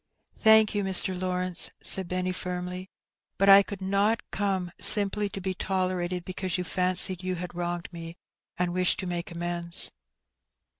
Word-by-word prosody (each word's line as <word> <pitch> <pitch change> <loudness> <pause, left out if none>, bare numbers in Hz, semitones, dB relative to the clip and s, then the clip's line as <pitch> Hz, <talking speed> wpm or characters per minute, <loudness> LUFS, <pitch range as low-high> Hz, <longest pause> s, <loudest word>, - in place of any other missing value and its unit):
*' - - -51
" - - -45
Thank 220 -1 +4
you, 205 -1 -2
Mr. 190 -1 +4
Lawrence,*' 180 -1 -1
said 190 -2 +2
Benny 185 +1 -3
firmly; 180 0 -6
'^ - - -34 0.5
but 195 +1 +2
I 195 0 +8
could 200 -1 -8
not 200 +4 0
come 190 -3 -3
simply 205 0 +5
to 195 - -8
be 190 0 -4
tolerated 185 -2 -3
because 185 -1 -5
you 180 - -4
fancied 185 0 0
you 185 0 -4
had 180 0 -8
wronged 175 0 -5
me, 165 0 -10 0.4
and 175 -1 -2
wished 180 0 0
to - - -7
make 175 -1 -5
amends. 170 0 +3
185 Hz, 170 wpm, -26 LUFS, 175-195 Hz, 0.5 s, I